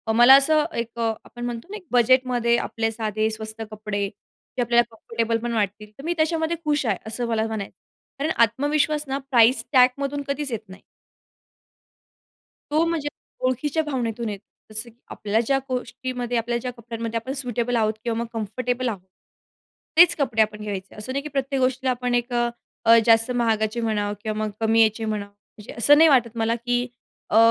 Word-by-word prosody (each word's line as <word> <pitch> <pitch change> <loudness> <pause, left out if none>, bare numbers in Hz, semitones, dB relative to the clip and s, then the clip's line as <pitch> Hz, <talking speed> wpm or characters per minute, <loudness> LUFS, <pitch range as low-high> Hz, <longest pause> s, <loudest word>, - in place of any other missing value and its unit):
मला 240 +3 +9
असं 300 +2 +4
एक 235 0 -4
अ, 230 -1 +1
आपण 240 0 -8
म्हणतो 235 +1 -5
ना 420 - -4
एक 385 - -15
बजेटमध्ये 245 -1 +3
आपले 225 -1 -2
साधे 220 -1 -1
स्वस्त 220 0 -6
कपडे, 210 -1 -3
जे 205 +4 -10
आपल्याला 240 0 +4
कम्फर्टेबल 230 0 -1
पण 240 0 -2
वाटतील 210 -1 -2
तर 275 - -11
मी 340 +3 0
त्याच्यामध्ये 320 +1 0
खुश 295 -2 +1
आहे 210 -5 +1
असं 235 +2 -3
मला 225 -1 0
म्हणायचं. 220 -3 -5 0.4
कारण 305 +3 0
आत्मविश्वास 290 +6 +1
ना 270 0 -1
प्राइस 240 +1 +5
टॅगमधून 275 +2 +3
कधीच 280 -1 -3
येत 230 - -2
नाही. 190 - -12 1.9
तो 310 +2 +3
म्हणजे 330 -3 -1 0.4
ओळखीच्या 290 +5 0
भावनेतून 240 -6 -3
येतो. 200 -2 -7 0.3
जसं 220 +2 -3
की 225 - -22
आपल्या 210 +1 -1
ज्या 270 +3 +2
गोष्टीमध्ये 250 -1 -3
आपल्या 235 +1 -1
ज्या 250 +1 -4
कपड्यांमध्ये 230 -1 -5
आपण 260 +4 -5
सुटेबल 245 -3 -2
आहोत 220 -2 +2
किंवा 230 -2 -1
मग 235 - -2
कम्फर्टेबल 245 +3 -2
आहोत. 200 -5 -5 1.0
तेच 340 0 +8
कपडे 245 -7 +1
आपण 215 0 0
घ्यायचे. 200 -2 -6
असं 210 +4 -6
नाही 275 - -1
की 300 - -6
प्रत्येक 275 -1 -1
गोष्टीला 255 0 +1
आपण 245 0 -1
एक 240 +1 -1
अ, 240 0 +1 0.4
अ, 230 0 +8
जास्त 225 +1 +4
महागाचे 225 -1 0
म्हणावं 210 -2 -1
किंवा 215 -1 -3
मग 215 - -2
कमी 225 0 +4
याचे 220 +1 0
म्हणावं. 210 -2 -3 0.3
म्हणजे 210 - -10
असं 285 +6 +6
नाही 320 +1 +7
वाटत 240 -4 +3
मला 225 +1 +1
की 245 +1 0 0.5
अ, 215 - +4
235 Hz, 180 wpm, -23 LUFS, 220-260 Hz, 1.9 s, मला